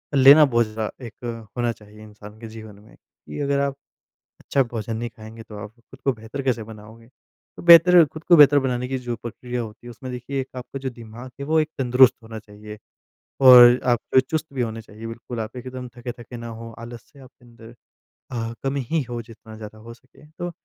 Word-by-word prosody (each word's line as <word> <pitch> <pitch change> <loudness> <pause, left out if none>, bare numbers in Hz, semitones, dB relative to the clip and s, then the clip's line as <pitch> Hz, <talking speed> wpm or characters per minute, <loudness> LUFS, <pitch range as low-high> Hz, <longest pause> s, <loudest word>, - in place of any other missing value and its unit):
लेना 140 +3 +8
बहुत 120 -3 +2
ज़्यादा 110 +3 -6
एक 115 0 -8
होना 120 -1 0
चाहिए 105 -1 -15
इंसान 105 0 -14
के 115 - -8
जीवन 110 -2 -11
में। 105 +1 -19
कि - - -13
अगर 140 0 0
आप 140 -1 -1 0.7
अच्छा 135 - +1
भोजन 115 -2 -5
नहीं 120 +1 -4
खाएँगे 110 0 -12
तो 110 -1 -12
आप 105 0 -8
खुद 130 +3 -18
को 135 - +2
बेहतर 115 +5 -7
कैसे 125 -4 -1
बनाओगे? 110 +1 -13 0.5
तो - - -10
बेहतर 170 0 +8
खुद 155 +2 -11
को 175 - +6
बेहतर 145 -1 +7
बनाने 125 -2 -2
की 135 -1 -2
जो 120 -2 -5
प्रक्रिया 120 +1 -6
होती 110 +2 -11
है - - -8
उसमें 125 +2 -9
देखिए 130 +2 -4
आपका 125 +2 -7
जो 135 0 -4
दिमाग 120 +1 -11
है 140 - -3
वो 160 +1 +2
एक 155 - -1
तंदुरुस्त 125 0 +5
होना 110 0 -9
चाहिए 105 0 -12 0.6
और 125 -1 +9
आप 120 - +2 0.3
चुस्त 160 0 -2
भी 130 - -2
होने 115 -1 -3
चाहिए 110 +1 -11
बिल्कुल 115 +1 -7
आप 110 +3 -6
एक 125 +1 -8
दम 125 -1 -7
थके-थके 120 0 -8
ना 115 - -8
हों, 115 0 -9
आलस 115 0 -9
से 140 - -19
आपके 130 -1 -18
अंदर 115 0 -15 0.6
अ, 115 -1 -4
कम 135 +1 -1
ही 140 +4 -1
हो 120 -1 -4
जितना 110 -1 -14
ज़्यादा 110 0 -10
हो 115 +2 -11
सके। 130 +5 -21
तो, 175 +3 -7
120 Hz, 210 wpm, -22 LUFS, 110-130 Hz, 0.7 s, और